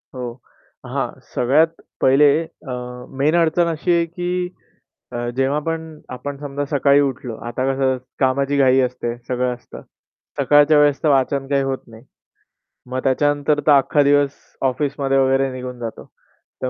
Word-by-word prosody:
हो. 125 -2 -4 0.5
हां, - - -2 0.2
सगळ्यात 155 +7 +2 0.2
पहिले 140 +3 +5 0.4
अ, - - -4 0.5
मेन 155 +4 +3
अडचण 170 0 +3
अशी 170 +2 -1
आहे 170 0 +2
की 180 +1 -3 0.6
अ, 120 0 -3
जेव्हा 135 +3 +1
पण 160 -1 -4
आपण 140 +2 -6
समजा 145 0 -4
सकाळी 140 0 +3
उठलो. 130 -4 -3
आता 130 +2 -2
कसं 130 -1 +1 0.2
कामाची 140 +1 +1
घाई 135 -1 +4
असते, 125 -1 -2
सगळं 125 0 0
असतं. 120 - -13 0.6
सकाळच्या 145 +1 +5
वेळेस 145 -1 +3
तर 155 - +3
वाचन 135 0 +1
काही 140 -1 +1
होत 135 -1 -1
नाही. 110 0 -14 0.9
मग 130 0 -2
त्याच्यानंतर 145 +2 +1
तर - - +7
अख्खा 145 +1 +4
दिवस 145 0 +3 0.4
ऑफिसमध्ये 135 0 -1
वगैरे 135 0 +2
निघून 125 -1 -7
जातो. 115 -2 -6 0.6
तर 130 - 0
140 Hz, 145 wpm, -20 LUFS, 130-150 Hz, 0.9 s, तर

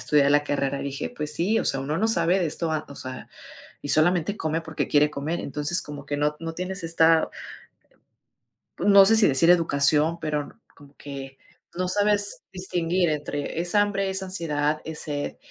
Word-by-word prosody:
estudiar 140 +1 +3
la 145 0 +4
carrera, 140 -1 -2
dije: 140 0 -5
"Pues 150 -1 -4
sí, 205 +6 +1
o - - -2
sea, 135 - +1
uno 145 +3 -3
no 220 - +1
sabe 175 -3 +2
de 175 - +1
esto, 160 +1 -2
a 155 - -2
o 140 - -10
sea, 130 0 -8 0.5
y 145 - -7
solamente 175 +5 +2
come 160 +1 -2
porque 160 -1 -4
quiere 150 0 +3
comer". 150 +3 -4
Entonces 150 +5 +1
como 145 -2 -9
que 145 0 -3
no 150 +1 0
no 165 0 -5
tienes 185 +2 -5
esta 165 -1 +3 1.5
no 200 -1 +6
sé 225 - +5
si 220 - +5
decir 140 +5 +4
educación, 160 -1 +3
pero 150 -2 -2
n - - -12 0.2
como 145 0 -18
que 135 -1 -9 0.4
no 185 +1 -1
sabes 205 +1 +1
distinguir 180 -1 -1
entre, 150 +1 -4
es 175 +2 -4
hambre, 200 -1 +1
es 190 0 0
ansiedad, 155 -5 -1
es 160 -1 -3
sed, 145 -1 -4
160 Hz, 185 wpm, -24 LUFS, 145-180 Hz, 1.5 s, no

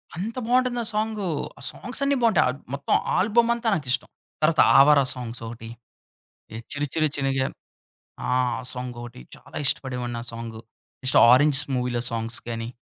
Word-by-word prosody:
అంత 205 +7 -4
బావుంటుందా 250 -1 +2
సాంగు. 215 -2 -1 0.3
ఆ - - -14
సాంగ్స్ 250 +3 -5
అన్నీ 280 0 +2
బావుంటాయి. 230 -3 +4
ఆహ్ 130 +2 -5
మొత్తం 140 0 -1 0.2
ఆల్బమ్ 230 +4 +3
అంతా 235 0 -4
నాకిష్టం. 135 -7 -1 0.3
తరువాత 155 0 +4 0.2
'ఆవారా' 140 0 +6
సాంగ్స్ 120 -2 -7
ఒకటి 115 0 -9 1.0
'చిరు 145 0 -1
చిరు 155 -1 +2
చినగ' 135 -1 0
ఆ! - - -9 0.8
ఆ 125 -1 0
సాంగొటి 120 - -7
చాలా - - -11
ఇష్టపడేవాడిని 125 -3 -2
ఆ - - -7
సాంగు. 115 -1 -7 0.4
నెక్స్ట్ 130 - +3
'ఆరెంజ్' 140 +3 +5
మూవీ‌లో 125 -1 -1
సాంగ్స్ 115 +1 -2
గాని 115 -1 -4
135 Hz, 145 wpm, -24 LUFS, 120-195 Hz, 1.0 s, ఆవారా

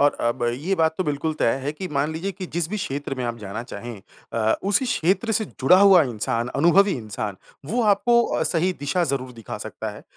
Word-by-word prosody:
और 145 0 +3
अब 120 +1 -1
ये 160 +10 -1
बात 160 -2 +2
तो 185 - 0
बिल्कुल 150 +2 -1
तय 115 - +3
है 145 +2 -2
कि 185 +3 -6
मान 145 +3 0
लीजिए 190 +5 -3
कि 185 0 -7
जिस 170 -1 -1
भी 215 - -2
क्षेत्र 140 -6 -3
में 130 -2 -4
आप 120 0 -3
जाना 105 +2 -6
चाहें 115 -2 -8 0.3
अ, 110 -1 +2
उसी 200 +6 +2
क्षेत्र 200 0 +1
से 215 +1 +1
जुड़ा 160 +1 +3
हुआ 195 -4 +7
इंसान, 115 -1 -2
अनुभवी 180 +8 +4
इंसान 105 -4 -4 0.3
वो 240 +1 +1
आपको 230 +3 +4
अ, - - -1
सही 180 +2 +1
दिशा 170 +5 0
ज़रूर 130 -3 -2
दिखा 115 -4 -8
सकता - - -6
है। - - -11
155 Hz, 220 wpm, -23 LUFS, 120-190 Hz, 0.3 s, हुआ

